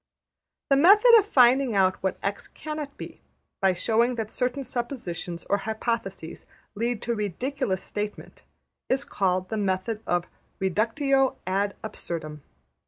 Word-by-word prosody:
'' - - -63
The - - +7
method 410 - +7
of 410 - -2
finding 255 - +4
out 190 -1 +2
what 190 -1 -1
$x$ 200 +1 -3
cannot 305 -2 -7
be, - - -9 0.4
by 190 -1 +4
showing 230 +6 +2
that 220 -2 -4
certain 255 +2 -1
suppositions 225 -9 -5
or 200 - +1
hypotheses 220 -6 -4 0.3
lead 230 +1 -2
to 240 - -1
a - - 0
ridiculous 210 - -2
statement, 210 0 -6 0.5
is 265 - 0
called 185 -1 0
the 220 - -2
method 200 +2 -1
of 175 0 +1 0.3
\emph{reductio 255 - +1
ad 195 +2 0
absurdum}. 165 -8 -6
220 Hz, 140 wpm, -26 LUFS, 190-255 Hz, 0.5 s, The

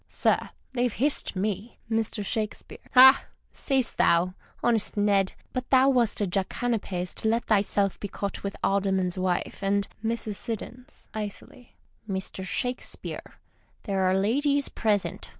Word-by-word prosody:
— - - -46
Sir, - - +1 0.2
they've 245 -1 +1
hissed 280 -2 0
7ne 205 +3 -2
1 225 0 +1
Mr. 215 -1 -3
Shakespeare. 215 0 -3
— - - -24
Ha! 265 +2 +9 0.2
say'st 265 -3 -1
thou, 175 +2 +3 0.3
honest 225 -3 +1
Ned! 200 -2 +2 0.2
But 255 0 -3
thou 265 0 +6
wast 240 -5 +2
a - - +3
jackanapes 195 -1 -2
to - - -3
let 230 +2 +1
thyself 200 -2 +1
be 205 - -4
caught 200 0 -4
with 200 0 -3
the - - -14
Alderman's 190 -2 0
wife 185 -1 -1
and 200 0 +1 0.2
Mrs. 225 -1 -2
S. 250 +1 -13
{icily). 215 +3 -7 0.2
— 215 - -26
Mr. 190 0 -4
Shakespeare, 245 +6 -4 0.4
there 195 -2 -1
are 190 - +2
ladies 280 +8 +1
present. 210 -3 -1
210 Hz, 150 wpm, -27 LUFS, 195-240 Hz, 0.4 s, Ha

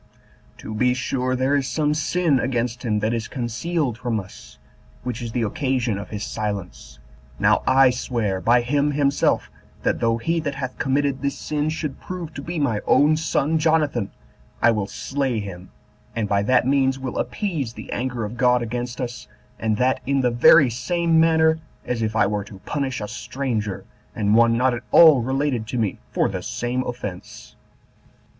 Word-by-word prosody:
To 110 - -7
be 125 +3 +2
sure 130 0 -1
there 130 +3 +1
is 135 -2 0
some 150 -1 0
sin 155 -1 +1
against 125 -1 -1
him 105 -3 0
that 110 +2 0
is 115 -2 -2
concealed 125 +1 -2
from 120 -3 -1
us, 70 -9 -12 0.5
which 125 -2 -4
is 115 -1 -4
the 120 0 -1
occasion 120 -1 -1
of 100 - -8
his 105 -1 -5
silence. 100 -13 -5 0.4
Now - - +3
I 130 0 +6
swear 115 -6 -2
by 120 +1 +4
him 145 +4 +1
himself, 140 0 +1 0.3
that - - +1
though 115 0 +1
he 165 +8 0
that 145 -3 -3
hath 130 -2 -5
committed 140 -1 0
this 140 0 -2
sin 150 0 -2
should 155 -3 -4
prove 175 -4 -6
to 140 - -6
be 170 +4 -5
my 120 -8 0
own 150 +2 +5
son 160 0 0
Jonathan, 155 -9 +1 0.5
I 120 - +5
will 105 -3 -1
slay 135 -2 -2
him, 95 -3 -8 0.5
and 110 -2 -1
by 100 0 +2
that 120 +4 +3
means 135 0 +2
will 130 -2 -4
appease 135 - -2
the - - -9
anger 120 -2 -2
of 110 +3 -7
God 125 -1 +3
against 120 +1 -4
us, 125 -1 -5 0.3
and 110 -1 0
that 130 +2 +2
in 140 -1 +2
the 125 -1 +2
very 120 +3 +6
same 165 +7 +1
manner 160 0 +4 0.3
as 120 -2 -2
if 110 -1 -1
I 115 - +4
were 105 0 -1
to 105 -2 -11
punish 135 -5 -2
a 105 - -3
stranger, 110 -2 -3 0.3
and 105 0 +1
one 115 0 +5
not 130 +1 +2
at 120 - -4
all 155 -6 +8
related 130 -2 -1
to 125 - -3
me, 110 -5 -1
for - - +1
the - - -4
same 120 +1 -2
offense." 105 -7 -7
125 Hz, 180 wpm, -22 LUFS, 115-140 Hz, 0.5 s, all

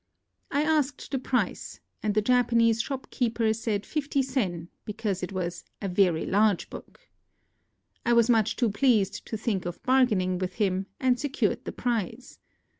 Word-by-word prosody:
I 285 - +1
asked 300 -3 0
the 270 - 0
price; 245 -6 -2 0.2
and 210 -1 -1
the 215 - +3
Japanese 230 -1 +3
shopkeeper 235 -4 -1
said 220 -2 -2
fifty 280 -2 -1
sen, 190 -11 -2
because 210 -3 -3
it 180 - -4
was 180 -2 -4 0.2
"a 200 - -3
very 180 -3 +2
large 205 -1 +2
book." - - -11 1.0
I 240 - +2
was 235 -1 +5
much 225 -4 +3
too 235 -4 +1
pleased 215 -3 +1
to 220 - -3
think 210 -4 -1
of 175 - -7
bargaining 215 -9 +2
with 185 -1 -3
him, 195 -2 0
and 255 -2 +2
secured 290 -2 -1
the - - -4
prize. 235 0 -3
225 Hz, 155 wpm, -27 LUFS, 195-250 Hz, 1.0 s, was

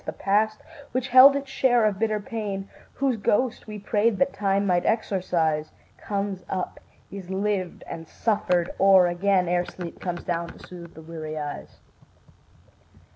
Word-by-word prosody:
The - - -5
past 215 +2 0 0.3
which 255 +1 -1
held 260 +3 +9
its 280 -1 -4
share 245 -4 +3
of 200 -2 0
bitter 215 -1 0
pain, 205 -2 -5 0.3
Whose 265 -3 0
ghost 225 +4 0
we 210 -1 -6
prayed 210 +1 +1
that 275 +4 +1
Time 200 0 0
might 180 -2 +2
exorcise, 175 -8 0 0.3
Comes 200 -2 -3
up, 185 -1 -4 0.3
is 195 -2 -8
lived 190 -1 -2
and 165 0 -8
suffered 180 -5 0
o'er 190 -2 +6
again, 180 +1 +1
Ere 175 0 0
sleep 175 -2 -8
comes 175 -1 -4
down 170 -1 -2
to - - -13
soothe 170 -2 -11
the 160 - -11
weary 155 -1 -7
eyes. 145 -1 -7
195 Hz, 155 wpm, -25 LUFS, 175-215 Hz, 0.3 s, held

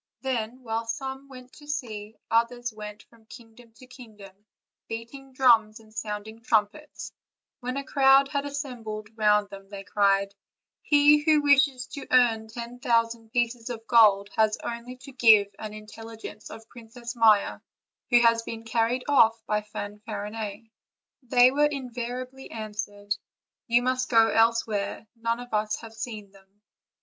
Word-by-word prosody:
Then, 250 -1 -3
while 225 0 -3
some 265 +3 -5
went 255 -1 -13
to 295 - -15
sea, 220 -7 -5 0.2
others 240 +1 0
went 210 -1 -9
from 225 -2 -24
kingdom 235 0 -15
to 255 +3 -16
kingdom, 215 -6 -13 0.5
beating 235 +4 -8
drums 230 -4 +3
and 215 -1 -19
sounding 220 0 -6
trumpets; 230 +6 -1 0.5
when 250 +1 -4
a 275 - -3
crowd 270 0 +5
had 280 0 -2
assembled 225 -6 -6
round 210 -2 +2
them 195 0 -11
they 200 -1 -8
cried: 200 -1 +1 0.5
"He 295 0 +5
who 300 0 +3
wishes 275 -3 +4
to 280 - -8
earn 230 -3 +3
ten 235 +2 -8
thousand 230 -2 0
pieces 240 0 -1
of 225 -2 -6
gold 205 -4 +5
has 220 -1 +2
only 235 +1 -6
to 255 +2 -12
give 215 -5 +5
an 215 -1 -6
intelligence 220 +1 -10
of 225 - -11
Princess 235 +1 -10
Maia, 220 -3 +4 0.5
who 240 -1 +6
has 230 -1 +4
been 230 0 -7
carried 230 +2 0
off 230 -5 +4
by 210 -1 0
Fanfar 210 0 -7
inet." 220 0 -6 0.5
They 250 0 +5
were 295 +2 +3
invariably 255 -1 -6
answered: 205 -2 -5 0.5
"You 240 0 +3
must 255 0 0
go 225 -2 +5
else 230 0 +3
where; 205 0 -4
none 230 +1 -2
of 245 -1 -10
us 210 0 0
have 225 -1 -11
seen 220 -3 -7
them." 195 +1 -23
230 Hz, 150 wpm, -26 LUFS, 215-250 Hz, 0.5 s, who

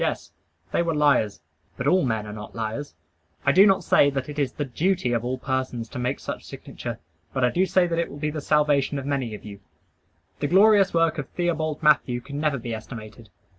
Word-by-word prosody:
Yes; - - -2 0.4
they - - +2
were 165 -2 0
liars. 140 -8 +2 0.4
But 125 - -4
all 185 +6 +4
men 110 -4 -1
are 105 - -7
not 105 0 -9
liars. 115 +6 -4 0.5
I 140 - +5
do 190 +7 +7
not 195 -1 +3
say 145 - +5
that 135 0 -4
it 150 0 -5
is 140 -3 0
the 145 - -3
duty 155 0 0
of 115 -1 0
all 125 +1 -2
persons 130 -3 -3
to - - -6
make 125 +2 -1
such - - -6
signature; - - -7 0.4
but 130 - 0
I 125 - +2
do 185 +2 +2
say 185 -1 +3
that 170 -1 -1
it 170 - -1
will 145 - -9
be 150 +1 -2
the 155 0 -4
salvation 145 -1 +2
of 135 - -5
many 135 -6 -2
of - - -12
you. 100 -1 -9 0.8
The - - 0
glorious 195 +2 +5
work 165 -1 +2
of 135 - -5
Theobald 160 -3 -2
Mathew 140 -5 +3
can 140 +4 -7
never 150 -2 +1
be 120 -1 -5
estimated. 110 0 -9
140 Hz, 220 wpm, -24 LUFS, 120-160 Hz, 0.8 s, do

